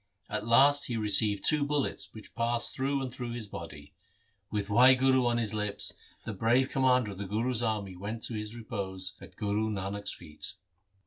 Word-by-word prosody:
At 110 - -3
last 140 +5 +5
he 120 - -2
received 105 -1 +3
two 150 -1 +4
bullets 145 -1 -2
which 110 - -12
passed 115 0 +1
through 135 +1 -1
and 130 -2 -5
through 120 -2 -5
his 115 -3 -5
body. 80 -6 -9 0.6
With 105 -1 -2
Wahguru 130 +3 +5
on 120 0 +1
his 110 -3 -1
lips 105 -1 -1 0.3
the 110 - -4
brave 120 +6 +2
commander 125 -4 +2
of 95 - -9
the 100 - -4
Guru's 115 +4 0
army 105 -5 -2
went 105 +5 -6
to - - -1
his 105 +1 -5
repose 95 -4 -4
at - - -13
Guru 105 +1 -1
Nanak's 100 0 -2
feet. 75 0 -8
110 Hz, 180 wpm, -30 LUFS, 100-125 Hz, 0.6 s, last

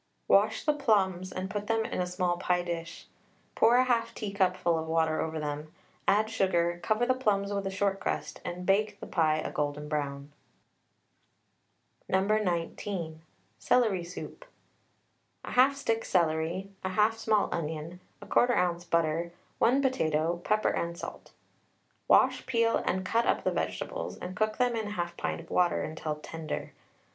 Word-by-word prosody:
Wash 205 +2 +4
the 300 - +4
plums 190 -9 +1
and 185 +1 -4
put 205 +2 -4
them 225 -1 +1
in - - -2
a 180 - -1
small 180 -1 0
pie 180 0 +1
dish, 170 -1 -5 0.5
pour 235 +2 +5
1/2 240 -2 0
teacupful 185 -4 +1
of 160 0 -3
water 160 -1 +1
over 160 0 -3
them, 150 +1 -4 0.4
add 210 +2 +4
sugar, 175 -5 +1
cover 215 +3 +1
the 255 - +3
plums 205 -5 0
with 200 -1 -2
a - - 0
short 195 0 0
crust, - - -3
and 180 +1 -5
bake 205 +1 +2
the - - -7
pie 155 -3 +2
a - - -3
golden 150 0 -2
brown. 145 -1 -3 1.8
No. 190 - +3
19. 175 -4 -1 0.4
CELERY 215 -8 +2
SOUP. 180 - -8 1.0
1/2 265 +3 +4
stick 225 -5 -1
celery, 170 +2 0
1/2 210 +4 +2
small 215 -2 +2
onion, 160 +2 -4 0.2
1/4 245 0 +3
oz. 175 -1 +1
butter, 170 0 0 0.3
1 260 +4 +4
potato, 165 - +1
pepper 215 0 +2
and 170 0 -2
salt. - - -8 0.8
Wash, - - +4
peel, 230 -3 +2
and 185 +1 0
cut 230 +5 +1
up - - +1
the - - +1
vegetables, - - -3
and 185 +1 -7
cook 215 +2 0
them 245 -1 +2
in 215 -2 -3
1/2 175 -2 -3
pint - - -3
of 165 - -15
water 175 -3 +1
till 155 -1 -3
tender. 155 +1 -6
185 Hz, 155 wpm, -29 LUFS, 165-215 Hz, 1.8 s, pour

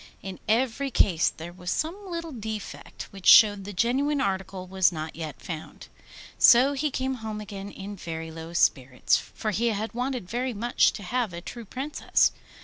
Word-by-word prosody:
In 190 -1 -7
every 255 +4 +1
case 175 -9 +3
there 170 +2 -9
was 180 0 -7
some 370 - -3
little 335 -2 -4
defect, 220 -4 -6
which 195 -2 -7
showed 205 -3 +8
the 205 - -6
genuine 265 +9 +1
article 190 -3 -2
was 185 0 +3
not 155 -1 -6
yet 160 -2 -6
found. 160 -3 -8 0.5
So 255 +4 +7
he 295 +2 0
came 265 0 -2
home 215 -1 -5
again 200 -1 -7
in 200 +1 -8
very 165 -3 -6
low 165 +1 -8
spirits, 130 -6 +2
for 215 - -4
he 230 +4 0
had 220 0 -2
wanted 250 -4 -3
very 245 +4 -2
much 240 +4 +3
to 205 - -8
have 235 -1 -1
a 170 - -5
true 235 +5 -8
Princess. 270 +8 +1
210 Hz, 175 wpm, -26 LUFS, 180-250 Hz, 0.5 s, showed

